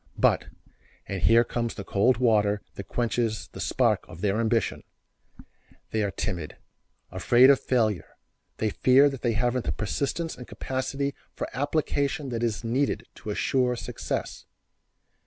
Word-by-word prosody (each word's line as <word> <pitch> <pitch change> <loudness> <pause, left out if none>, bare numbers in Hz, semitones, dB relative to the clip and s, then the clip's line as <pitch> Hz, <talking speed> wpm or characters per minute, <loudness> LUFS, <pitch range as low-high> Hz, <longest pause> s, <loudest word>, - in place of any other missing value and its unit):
But, - - +3 0.6
and 95 -2 -4
here 115 +1 +6
comes 120 -1 -3
the 100 - -6
cold 110 +6 +2
water 105 -4 +2
that 100 - -8
quenches 115 -2 -1
the - - -11
spark - - +1
of 80 - -11
their 105 +1 +1
ambition, 115 0 0 1.1
they 110 - 0
are 100 - +1
timid; 90 -6 -4 0.5
afraid 120 +8 +6
of 140 - +3
failure; 110 -7 0 0.4
they 110 -1 0
fear 135 +6 +5
that 135 -3 -7
they 120 -2 +1
haven't 120 +2 0
the - - 0
persistence 140 - -2
and 125 - -10
capacity 135 +2 -3 0.2
for - - -3
application 145 +1 -1
that 115 -2 -3
is 115 -1 -1
needed 130 +5 0
to - - -9
assure 125 +4 +1
success. - - -5
120 Hz, 145 wpm, -26 LUFS, 105-130 Hz, 1.1 s, here